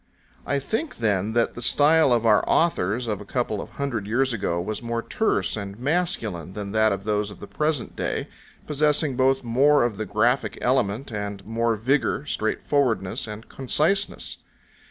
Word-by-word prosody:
I 140 - +1
think, 220 - -3
then, 105 -1 0
that 115 0 +2
the 120 - -8
style 150 +3 +4
of 120 -1 +2
our 105 -2 +5
authors 120 - +2
of 105 -3 -2
a - - -6
couple 110 -1 -2
of - - -9
hundred 120 -8 -3
years 130 +3 +1
ago 95 -6 -1
was 105 +4 -3
more 115 -1 -3
terse 220 - 0
and 100 -2 -6
masculine 120 - -1
than 100 0 -5
that 110 0 +3
of 100 -1 -3
those 105 0 0
of 100 - -11
the - - -8
present 150 -5 -1
day, - - -2 0.4
possessing 150 -1 +1
both 135 +1 +2
more 135 +5 +4
of 115 -4 -1
the 110 - -3
graphic 120 +6 +1
element, 125 -1 0
and 100 -2 -5
more 115 +1 0
vigour, 135 +5 0
straightforwardness, 110 -5 0
and 105 +1 -8
conciseness. 160 +9 -1
115 Hz, 170 wpm, -24 LUFS, 105-140 Hz, 0.4 s, our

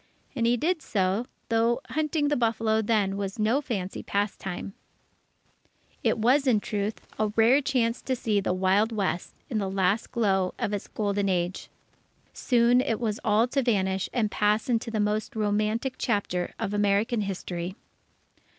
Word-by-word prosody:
And 230 -3 +1
he 240 +1 +3
did 330 +5 0
so, 200 0 0 0.2
though 230 +1 +2
hunting 305 -1 0
the 295 - +2
buffalo 225 -2 +1
then 205 -3 +1
was 195 -1 -4
no 225 +6 +2
fancy 200 -9 -4
pastime. 200 -1 -3 1.3
It - - +2
was, 260 +6 +3
in 230 -5 +4
truth, 205 +1 -3 0.2
a 215 - +2
rare 235 +5 +5
chance 250 -4 0
to 260 - -1
see 215 -4 0
the 195 - -1
Wild 190 +4 +2
West 195 -5 -2
in 225 -5 -1
the 195 -2 -2
last 195 +3 0
glow 195 -6 +1
of 205 - -2
its 205 - -3
golden 205 -1 -1
age. 180 0 -1 0.6
Soon 245 0 +3
it 225 -4 -1
was 220 -3 -2
all 220 +1 +3
to 275 +2 +1
vanish 190 -6 0
and 215 -4 0
pass 210 +3 +1
into 230 -1 0
the 220 -1 -2
most 210 +2 -1
romantic 215 +4 0
chapter 195 -6 -1
of 215 -3 -3
American 205 +3 +2
history. 185 -2 -4
215 Hz, 160 wpm, -27 LUFS, 200-235 Hz, 1.3 s, rare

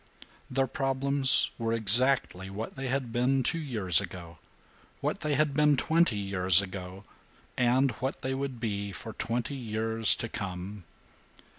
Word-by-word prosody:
Their 135 +1 0
problems 135 +1 +3
were 115 0 -2
exactly 110 -3 +4
what 105 +4 -7
they 135 -1 -5
had 130 -2 -3
been 125 +3 0
two 165 - -2
years 105 - +1
ago, 85 -4 -10 0.6
what - - -3
they 150 -1 -2
had 150 0 0
been 150 0 +2
twenty 160 -6 +1
years 95 -2 +4
ago, 95 0 -5 0.5
and 130 +2 +1
what 130 +3 -5
they 130 - -2
would 135 -2 -5
be 100 -3 -4
for 110 +4 -9
twenty 115 +3 -4
years 110 -2 0
to 120 - -5
come. 95 -2 -7
115 Hz, 145 wpm, -28 LUFS, 100-135 Hz, 0.6 s, exactly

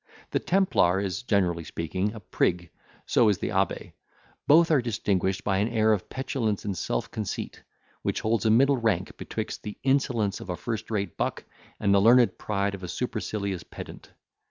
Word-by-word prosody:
The - - +1
templar 170 - +2
is, 95 -3 -2
generally 90 -8 +1
speaking, 95 +7 -3
a - - -7
prig, 90 -3 -1 0.3
so 115 -3 +4
is 100 - +2
the - - -3
abbe: 95 -1 -1 0.5
both 165 +3 +6
are 145 -4 +4
distinguished 100 -5 -1
by 95 -2 +1
an 105 - +2
air 110 -2 +3
of 100 - -3
petulance 130 -7 -2
and 100 -2 -2
self - - -2
conceit, 110 -3 -5 0.4
which - - -1
holds 110 -1 +1
a - - +4
middle 135 +5 +5
rank 105 -6 0
betwixt - - -5
the 105 - -7
insolence 125 -7 +1
of - - -10
a 90 - -1
first 110 +5 -4
rate 100 -3 -2
buck - - -2 0.4
and 100 - +2
the 100 - +5
learned 120 +3 +5
pride 100 -1 -1
of 100 - -7
a 90 - -5
supercilious 100 -3 -3
pedant. - - -10
105 Hz, 180 wpm, -27 LUFS, 95-115 Hz, 0.5 s, both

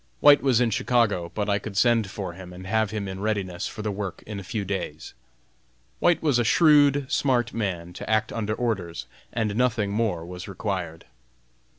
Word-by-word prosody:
White 145 0 +7
was 130 -4 +3
in 120 -2 +2
Chicago, 115 -7 +1
but 105 -1 -1
I 100 -1 +1
could 100 -1 -7
send 115 -3 +3
for 95 -2 -5
him 90 0 -10
and 90 +1 -10
have 110 +2 +1
him 105 -2 -4
in 95 0 -6
readiness 100 -3 -2
for 105 - -7
the 105 - -1
work 100 -2 -5
in 105 -2 -6
a - - -8
few 100 +2 -3
days. 90 -5 -5 0.9
White 175 -2 +3
was 145 -6 +3
a - - +3
shrewd, 145 +1 +5
smart 130 -5 +1
man 90 -6 -3
to - - -8
act 110 0 +1
under 110 -1 -2
orders, 95 -9 -2 0.3
and 110 -3 -1
nothing 115 -4 +1
more 100 -6 -1
was 90 +2 -8
required. 90 -5 -4
105 Hz, 190 wpm, -25 LUFS, 95-120 Hz, 0.9 s, White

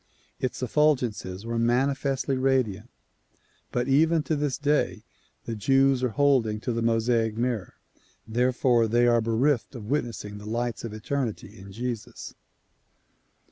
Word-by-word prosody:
Its 130 0 -3
effulgences 120 -9 0
were 115 0 -2
manifestly 135 +3 +1
radiant 130 -5 0 0.8
but 120 +1 -1
even 160 +3 +3
to 155 - -1
this 145 -3 -1
day 150 0 0 0.4
the 115 - -4
Jews 135 +4 +3
are 125 - +2
holding 125 -5 +2
to 120 - -2
the 115 - -1
IMosaic 115 -1 +1
mirror. 115 -5 -2 0.5
Therefore 120 0 +2
they 120 +2 +3
are 120 -1 +4
bereft 115 +4 0
of 110 -1 -7
witnessing 115 -7 -3
the 105 +1 -8
lights 120 0 -2
of 115 - -5
eternity 110 -1 -4
in 95 +1 -11
Jesus. 120 0 -6
120 Hz, 135 wpm, -26 LUFS, 110-135 Hz, 0.8 s, are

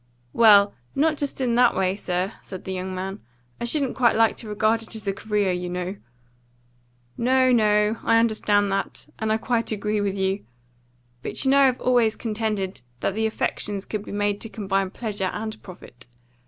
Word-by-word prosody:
"Well, 205 -3 +6 0.2
not 310 +2 +2
just 285 -2 -2
in 245 -2 +1
that 245 +1 +4
way, 190 0 +1
sir," 185 +1 -2
said 185 -2 -9
the 190 - -4
young 185 0 -4
man. 190 +2 -4 0.4
"I - - -2
shouldn't 275 +1 -1
quite 240 -2 +3
like 225 0 +3
to 220 - -6
regard 215 +2 +1
it 225 - -6
as 215 -2 -6
a 195 - +1
career, 205 -1 0
you 180 0 -3
know." 180 +2 -3 1.2
"No, 255 +1 +3
no. 210 -1 +3
I 230 - +4
understand 210 -3 +2
that. 195 0 -3
And 220 0 -1
I 220 - +3
quite 230 0 -1
agree 210 0 -1
with 200 -1 -1
you. 190 +1 -1 0.8
But - - -3
you 265 - +4
know 280 - +5
I've 265 -2 +4
always 240 -3 +3
contended 210 - -3 0.2
that - - 0
the 220 +2 0
affections 205 -2 -2
could 215 -2 -4
be - - -9
made 205 0 -1
to 225 - -3
combine 195 -3 -1
pleasure 205 -3 -3
and 220 0 -5
profit. 125 -10 -13
210 Hz, 185 wpm, -24 LUFS, 195-230 Hz, 1.2 s, Well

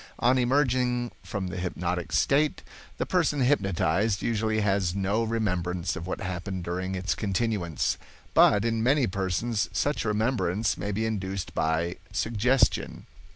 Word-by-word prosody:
On 130 +1 +3
emerging 125 -2 +1
from 95 -3 -4
the 95 - -5
hypnotic 90 -1 -3
state, 145 +2 +2 0.3
the - - -1
person 165 -6 +1
hypnotized 100 - +1
usually 110 -1 0
has 95 -3 +1
no 100 +3 +1
remembrance 90 -6 -1
of 90 -2 -6
what - - -4
happened 95 0 -4
during 90 +2 -3
its 95 +1 -1
continuance, 100 -5 -1 0.3
but 105 +1 +5
in 115 -1 0
many 135 +3 +3
persons 100 +3 -1
such 145 +1 0
remembrance 105 -2 0
may 100 - -3
be 110 +3 -1
induced 95 -4 -3
by 80 +3 0
'suggestion'. 115 +5 +1
105 Hz, 135 wpm, -27 LUFS, 90-120 Hz, 0.3 s, but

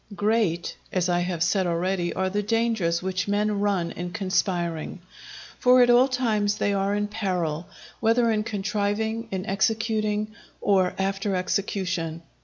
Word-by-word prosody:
Great, 205 -5 0 0.2
as 185 -1 0
I 175 0 +2
have 175 -2 -1
said 185 +1 +1
already, 175 +1 0
are 190 - 0
the 205 +1 0
dangers 215 -6 0
which 185 0 -2
men 205 0 +1
run 195 -4 0
in 175 0 -5
conspiring; 180 -4 -1 0.6
for 250 0 +6
at 245 - +4
all 245 +2 +6
times 220 -6 +1
they 205 - +1
are 200 +1 0
in 205 0 0
peril, 180 -6 -2 0.3
whether 230 +1 +3
in 215 -1 +1
contriving, 215 +1 -2
in 190 -1 -3
executing, 215 +1 0 0.3
or 190 -3 +2
after 195 +1 -1
execution. 180 -3 -2
200 Hz, 145 wpm, -25 LUFS, 180-215 Hz, 0.6 s, for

